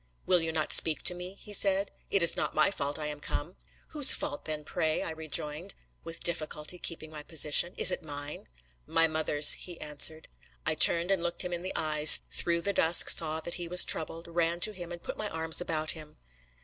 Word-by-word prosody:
"Will 180 -2 +2
you 165 0 -3
not 155 -1 -3
speak 155 -3 +4
to - - +3
me?" 180 +2 -8
he 210 - -10
said. 195 0 +2 0.2
"It 195 -3 +1
is 170 - +5
not - - -4
my 155 +6 +2
fault 145 -6 -4
I 155 - -6
am 150 -1 -7
come." 150 +4 -6 0.3
"Whose 295 -3 +5
fault 145 - -6
then, 155 -1 -5
pray?" 160 -1 -3
I - - -4
rejoined, 160 +2 -3 0.3
with 165 0 -8
difficulty 160 0 -2
keeping 160 -2 -3
my 155 -1 -9
position. 155 +3 +3
"Is - - +5
it - - -4
mine?" 145 -1 -8 0.4
"My 165 0 +2
mother's," 155 -2 +3
he 175 -2 -4
answered. 150 +1 -1 0.4
I 160 - +1
turned 170 +3 +4
and 190 -3 0
looked 170 +2 -3
him 180 -1 -6
in 175 - -5
the 185 - -7
eyes, 155 -1 +5
through 170 -1 -1
the 200 +3 -2
dusk 165 -1 +4
saw 160 -1 +2
that 170 - -5
he 170 - -5
was 180 +1 +4
troubled, 165 +1 -2
ran 170 0 -2
to 215 - +5
him, 175 -4 -10
and 175 0 -10
put - - -7
my 215 -1 -4
arms 160 0 -3
about 155 -2 -2
him. 155 -2 -12
165 Hz, 215 wpm, -28 LUFS, 155-175 Hz, 0.4 s, is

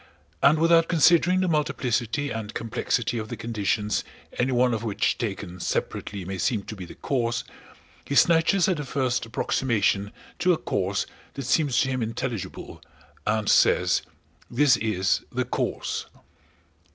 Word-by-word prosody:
And 150 +3 +5
without 165 +1 +4
considering 175 +2 +4
the 185 - +1
multiplicity 140 -3 0
and 110 -1 -5
complexity 115 0 -1
of 110 0 -6
the - - -5
conditions 105 -2 -1 0.4
any 125 +2 +2
one 125 -1 +3
of 115 -1 -2
which 110 -4 0
taken 100 -5 -4
separately 95 +2 -3
may 95 0 -5
seem 105 +3 0
to 110 - -8
be 95 -3 -8
the - - -12
cause, 120 -4 -1 0.6
he 140 - -4
snatches 165 +4 +4
at 185 -3 +1
the 150 - -3
first 130 -4 -1
approximation 105 -4 0 0.3
to 180 0 +4
a - - 0
cause 95 -5 -1 0.3
that 140 - -5
seems 145 -1 +2
to 130 - 0
him 130 -1 -1
intelligible 115 -1 -5 0.5
and 110 -1 +1
says: - - +4 0.5
"This 145 -3 +4
is 100 -2 0
the 125 +1 -1
cause!" 125 - -3
120 Hz, 150 wpm, -25 LUFS, 105-145 Hz, 0.6 s, And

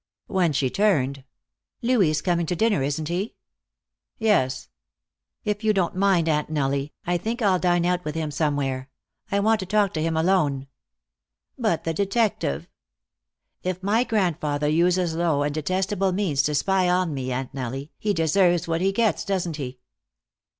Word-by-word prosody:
When 180 -4 +1
she 135 -3 0
turned: 140 -10 +1 0.6
"Louis 230 -8 +3
is 150 -1 -1
coming 170 -2 +1
to 180 - -1
dinner, 215 -3 +2
isn't 145 +3 -2
he?" 180 +6 -3 0.8
"Yes." 130 - +1 0.8
"If 210 +1 -2
you 215 -1 +3
don't 185 -4 0
mind, 185 -3 +3
Aunt 150 -2 +1
Nellie, 140 -1 -1
I 175 0 0
think 230 +6 -3
I'll 190 -3 +3
dine 175 -1 +2
out 180 0 +1
with 150 -2 -4
him 160 -2 -2
somewhere. 140 -3 -1 0.4
I 200 - +2
want 220 +2 +3
to 190 - -5
talk 205 0 +2
to 155 - -2
him 160 0 0
alone." 160 -6 +2 0.9
"But 215 -10 0
the 165 - -1
detective 200 - 0 0.5
" - - -60 0.2
"If 185 0 -3
my 215 +5 +3
grandfather 160 - 0
uses 175 +2 +2
low 160 -4 +1
and 145 0 -1
detestable 185 +4 0
means 180 -8 +1
to 150 +1 0
spy 185 +4 +2
on 180 -3 +1
me, 130 -2 -3
Aunt 130 +1 -3
Nellie, 135 +2 -5
he 210 - 0
deserves 175 0 +2
what 165 0 0
he 195 +1 +2
gets, 220 +1 +1
doesn't 180 -6 -2
he?" 130 -3 -5
175 Hz, 165 wpm, -24 LUFS, 150-195 Hz, 0.9 s, Louis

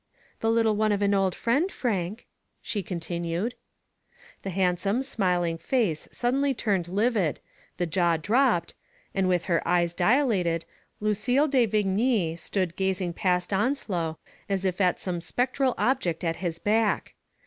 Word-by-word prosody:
The 225 - 0
little 225 -1 +3
one 215 0 +2
of 205 0 +1
an 200 0 +3
old 195 -2 +2
friend, 280 - +1
Frank," 210 -2 -2 0.3
she 205 - -3
continued. 170 +4 -3 0.9
The 195 - -5
handsome, 190 +5 +1
smiling 180 -9 0
face 210 - 0
suddenly 270 +3 +1
turned 195 -7 0
livid, 200 - +1 0.4
the 175 - 0
jaw 170 -1 +2
dropped, 220 - +2 0.4
and 190 -1 +1
with 180 -2 +2
her 170 -2 +1
eyes 175 -1 +2
dilated, 180 - +2 0.4
Lucille 215 +8 +2
de 260 -5 +3
Vigny 205 -3 +1
stood 175 0 -2
gazing 190 -2 -1
past 180 +2 0
Onslow 190 - 0 0.3
as 195 -1 -1
if 185 +1 0
at 180 -2 +2
some 175 -2 -3
spectral 255 +6 0
object 215 -12 0
at 165 -1 -1
his 170 -3 -3
back. 215 +3 +1
195 Hz, 140 wpm, -26 LUFS, 175-230 Hz, 0.9 s, little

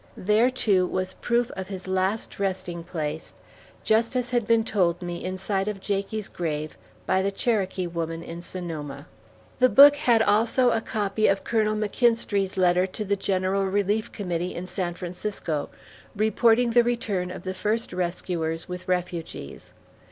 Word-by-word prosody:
There, 210 +6 +3
too, 200 -8 +2
was 185 0 -2
proof 240 0 +1
of 190 -1 -6
his 190 -1 -7
last 190 +4 -1
resting 185 -3 -2
place, 160 -2 -5 0.5
just 225 +3 +2
as 250 0 -1
had 240 -3 +1
been 230 -1 +4
told 180 -5 0
me 175 -1 -5
in 185 +1 -3
sight 195 +1 -1
of 210 -2 -3
Jakie's 200 +1 -2
grave, 155 -3 -4 0.3
by 190 - +2
the 195 - +1
Cherokee 195 -3 0
woman 165 -1 -4
in 170 +1 -7
Sonoma. 155 -6 -6 0.5
The 255 0 +6
book 285 +2 +9
had 240 -6 +3
also 230 +4 +3
a 225 - +1
copy 215 -1 0
of 195 - +1
Colonel 215 -2 +1
McKinstrey's 210 -2 +1
letter 180 0 +3
to 210 +3 -5
the 200 +1 +1
General 195 0 0
Relief 205 +2 0
Committee 180 -3 -3
in 175 - -5
San 180 -1 -3
Francisco, 175 -4 -4 0.5
reporting 230 +3 +3
the 240 +1 +5
return 210 -6 -1
of 185 - -8
the 185 - -3
first 210 +3 -2
rescuers 170 -2 -2
with 180 0 -7
refugees. 175 - -4
190 Hz, 160 wpm, -25 LUFS, 180-220 Hz, 0.5 s, book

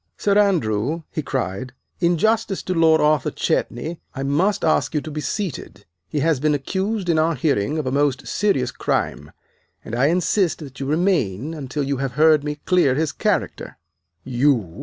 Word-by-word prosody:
"Sir 200 -1 +1
Andrew," 160 - +1
he 155 - -2
cried, 125 -3 -3 0.3
"in 175 -1 +2
justice 220 +1 +1
to 185 - -2
Lord 160 -2 +4
Arthur 150 -1 +2
Chetney 160 +8 -2 0.2
I 135 - -3
must 165 +9 +1
ask 155 - +1
you 150 - +1
to 155 - -7
be 150 +1 -4
seated. 150 - -5 0.2
He 150 - -1
has 160 -2 +2
been 150 +1 +2
accused 190 +7 -2
in 165 -2 +2
our 160 +1 +2
hearing 140 -1 0
of 155 - -2
a 130 - -1
most 140 -2 +1
serious 135 -13 0
crime, 75 -7 -2 0.5
and - - -8
I 125 +4 +3
insist 175 +1 +1
that 140 -4 -10
you 135 - -3
remain 155 - 0
until 145 -1 -4
you 140 0 -1
have 135 -1 -3
heard 155 +1 +4
me 150 0 -3
clear 175 -8 +3
his 155 +1 0
character." - - -2 0.5
"You!" 125 - 0
150 Hz, 180 wpm, -21 LUFS, 130-170 Hz, 0.5 s, Lord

